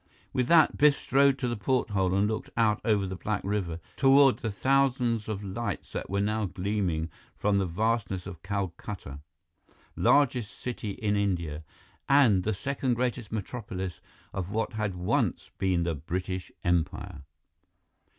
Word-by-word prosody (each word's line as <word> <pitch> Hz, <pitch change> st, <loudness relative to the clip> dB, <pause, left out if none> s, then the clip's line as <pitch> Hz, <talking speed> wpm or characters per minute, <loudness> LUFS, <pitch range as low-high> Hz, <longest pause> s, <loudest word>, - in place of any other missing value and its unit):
With 125 Hz, -1 st, +1 dB
that, 160 Hz, -1 st, +5 dB
Biff 145 Hz, -1 st, +6 dB
strode 140 Hz, 0 st, +3 dB
to 125 Hz, -, -2 dB
the 120 Hz, -, -1 dB
porthole 100 Hz, -4 st, +1 dB
and 100 Hz, +1 st, +3 dB
looked 110 Hz, 0 st, -3 dB
out 110 Hz, -2 st, +3 dB
over 105 Hz, -4 st, +2 dB
the 95 Hz, 0 st, -4 dB
black 105 Hz, +2 st, -2 dB
river, 95 Hz, -5 st, -2 dB, 0.2 s
toward 135 Hz, -1 st, +5 dB
the 110 Hz, -, -2 dB
thousands 125 Hz, 0 st, +1 dB
of 105 Hz, -1 st, -3 dB
lights 100 Hz, +1 st, -4 dB
that -, -, -4 dB
were 100 Hz, +1 st, 0 dB
now 105 Hz, +1 st, 0 dB
gleaming 90 Hz, -4 st, -1 dB, 0.3 s
from 100 Hz, -1 st, +2 dB
the 95 Hz, -, 0 dB
vastness 100 Hz, 0 st, -1 dB
of 85 Hz, -2 st, -8 dB
Calcutta, 95 Hz, -5 st, -5 dB, 0.8 s
largest 125 Hz, -6 st, +2 dB
city 120 Hz, -3 st, -4 dB
in 105 Hz, -1 st, -1 dB
India, 85 Hz, -7 st, -1 dB, 0.5 s
and 130 Hz, -9 st, +5 dB
the 110 Hz, -, -1 dB
second 130 Hz, +3 st, -1 dB
greatest 120 Hz, -2 st, -2 dB
metropolis 95 Hz, -5 st, -5 dB, 0.3 s
of 95 Hz, -2 st, -3 dB
what 110 Hz, +3 st, -1 dB
had 105 Hz, -3 st, -2 dB
once 90 Hz, 0 st, 0 dB
been 90 Hz, -3 st, +2 dB
the 85 Hz, -1 st, 0 dB
British 90 Hz, +5 st, -4 dB
Empire. 85 Hz, -1 st, -1 dB
105 Hz, 150 wpm, -28 LUFS, 95-120 Hz, 0.8 s, Biff